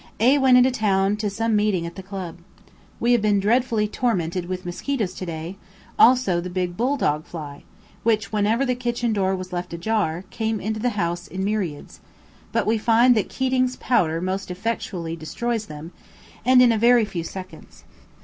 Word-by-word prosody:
A 260 +6 +5
went 260 -2 +6
into 250 +1 +5
town 200 -4 +1
to 210 -1 -1
some 225 +2 0
meeting 205 -5 +1
at 170 - -6
the 190 - -8
Club. 185 -3 -7 0.6
We 235 - +2
have 240 -2 +4
been 205 -1 +2
dreadfully 225 +1 +1
tormented 180 -6 -1
with 185 0 -5
mosquitoes 200 +2 -2
today, 170 0 -6 0.4
also 235 -9 +5
the 180 - -6
big 180 -1 -2
"bull 255 +8 0
dog" 150 - 0
fly, 150 -4 -9 0.4
which, 220 -1 +1
whenever 215 +5 +1
the 250 - +1
kitchen 240 -2 -1
door 190 -2 +1
was 185 0 -7
left 175 0 -4
ajar, 175 -2 -1
came 220 -1 -2
into 215 +1 -3
the 235 -1 -1
house 175 -1 -2
in 190 +1 -4
myriads; 195 -8 -3 0.5
but - - 0
we 220 +1 +1
find 235 +3 +5
that 215 -4 0
Keating's 255 -1 0
powder 165 -9 +1
most 190 +1 -3
effectually 180 -4 -3
destroys 220 +8 -3
them, 155 +3 -9 0.5
and 255 +1 +6
in 240 - +5
a 225 - +1
very 235 0 +5
few 175 -5 -5
seconds. 185 +2 -10
205 Hz, 180 wpm, -23 LUFS, 180-235 Hz, 0.6 s, went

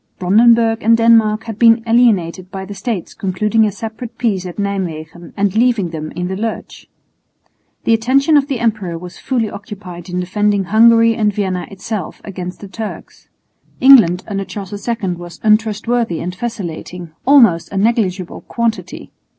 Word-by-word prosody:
Brandenburg 225 +4 +3
and 230 +1 +4
Denmark 225 -2 +3
had 220 -2 -7
been 230 -1 +5
alienated 200 -7 +2
by 190 0 -6
the 205 - -8
States 205 -3 -4
concluding 210 +4 0
a 210 - 0
separate 225 +3 -8
peace 200 -7 -1
at 175 - -8
Nijmwegen 175 -5 -4
and 200 0 0
leaving 225 -7 +2
them 155 -1 -6
in 180 +2 -3
the 190 - -3
lurch. 225 +3 -5 1.0
The 230 - +2
attention 270 +7 +2
of 285 -1 +3
the 270 -5 -3
emperor 210 -7 -1
was 180 +1 -10
fully 240 -4 -1
occupied 195 -4 -9
in 180 0 -3
defending 205 +2 0
Hungary 230 +4 +5
and 215 -2 +1
Vienna 190 -3 -3
itself 195 -1 -6
against 180 -2 -7
the 200 - -8
Turks. 215 +2 -8 0.5
England 225 -10 +6
under 195 -2 -3
Charles 195 +1 -8
II 230 -5 -1
was 175 0 -10
untrustworthy 220 -2 +1
and 180 +1 -4
vacillating, 180 -5 -6 0.2
almost 230 - +5
a 195 - -4
negligible 195 -4 0
quantity. 220 -6 -4
210 Hz, 155 wpm, -17 LUFS, 180-230 Hz, 1.0 s, England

